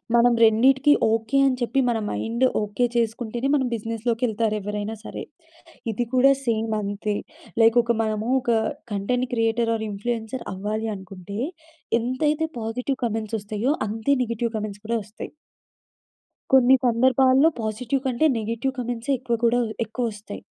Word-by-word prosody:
మనం 235 0 +5
రెండిటికి 265 +6 +5 0.2
ఓకే. 225 +4 0
అని 260 - +1
చెప్పి 255 +3 +1
మన 225 -2 0
మైండ్ 235 +3 0 0.2
ఓకే 210 +4 0
చేసుకుంటేనే 235 +2 -1
మనం 265 -3 +1
బిజినెస్‌లోకెళ్తారు 225 0 -1
ఎవ్వరైనా 210 +2 -4
సరే! - - -6 0.7
ఇది 240 +3 -2
కూడా 265 +2 +6
సేమ్ 225 -1 0
అంతే. 205 +1 -2 0.5
లైక్ 225 +1 +5
ఒక 235 - +1
మనము 215 +1 -2
ఒక 240 -2 -1 0.4
కంటెంట్ 245 +6 0
క్రియేటర్ 230 0 +1
ఆర్ 220 -1 -3
ఇన్‌ఫ్లూ‌యన్‌సర్ 225 +4 -4
అవ్వాలి 215 +3 -3
అనుకుంటే 190 +1 -8 0.6
ఎంతైతే 295 +6 0
పాజిటివ్ 250 +4 -2
కామెంట్స్ 225 0 -2
వస్తాయో 210 +5 -1 0.2
అంతే 225 +6 -1
నెగెటివ్ 230 0 -2
కామెంట్స్ 205 -1 -6
కూడా 235 - +1
వస్తాయి. 210 +2 -9 1.2
కొన్ని 265 0 +7
సందర్భాల్లో 260 +4 +4
పాజిటివ్ 235 +5 -2
కంటే 260 +5 +2
నెగెటివ్ 230 +5 -2
కామెంట్సే 245 +2 -2
ఎక్కువ 235 -1 -2
కూడా 235 +1 +4 0.3
ఎక్కువొస్తాయి. 220 -2 -5
230 Hz, 130 wpm, -24 LUFS, 215-250 Hz, 1.2 s, కొన్ని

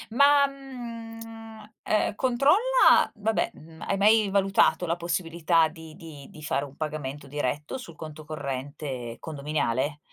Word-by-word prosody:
Ma, 280 +1 +6
mhmm, 225 -5 -9
ehm, 215 -1 +1
controlla 290 - +4
vabbè, 220 +1 0
mhmm, 160 +1 -15
hai - - 0
mai 210 +1 +4
valutato 195 -2 +3
la 165 - +1
possibilità 170 -1 +1
di 160 0 -12
di 160 -6 -11
di 155 - -12
fare 145 -2 -1
un 140 -1 -14
pagamento 150 -2 -5
diretto 145 - -3
sul 170 -11 -10
conto 155 -1 -9
corrente 135 -4 -5
condominiale? 145 -2 -2
165 Hz, 130 wpm, -26 LUFS, 150-225 Hz, -, Ma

